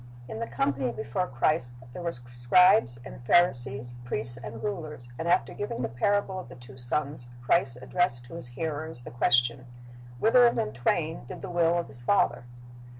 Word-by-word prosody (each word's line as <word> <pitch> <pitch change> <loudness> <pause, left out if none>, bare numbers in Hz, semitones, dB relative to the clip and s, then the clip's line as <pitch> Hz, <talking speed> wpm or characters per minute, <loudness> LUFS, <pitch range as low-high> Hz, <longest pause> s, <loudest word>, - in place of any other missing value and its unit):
"^ - - -17 0.2
In 110 - -6
the 115 - -3
company 130 +1 -1
before 120 +12 -3
Christ 120 -1 -1
there 180 - -7
were 170 -1 -2
scribes 120 - +3
and - - -10
Pharisees, 130 -5 +2
priests 120 0 0
and 115 -2 -8
rulers, 150 -11 -5
and 165 - -3
after 175 +2 +2
giving 230 +3 -4
the - - 0
parable 190 - 0
of - - -9
the - - -11
two 125 +2 -13
sons, 130 +1 -3 0.2
Christ 130 -2 +2
addressed 130 -7 0
to 125 - -13
His 170 -6 -6
hearers 155 0 -4
the - - -9
question, 120 +1 +2 0.5
"Whether 240 - +6
of 235 - +1
them 105 0 -1
twain 155 +5 -1
did - - -9
the 190 - -5
will 170 0 +3
of 170 - -2
his 120 - -13
father?" 120 -4 +1
130 Hz, 185 wpm, -28 LUFS, 120-170 Hz, 0.5 s, Whether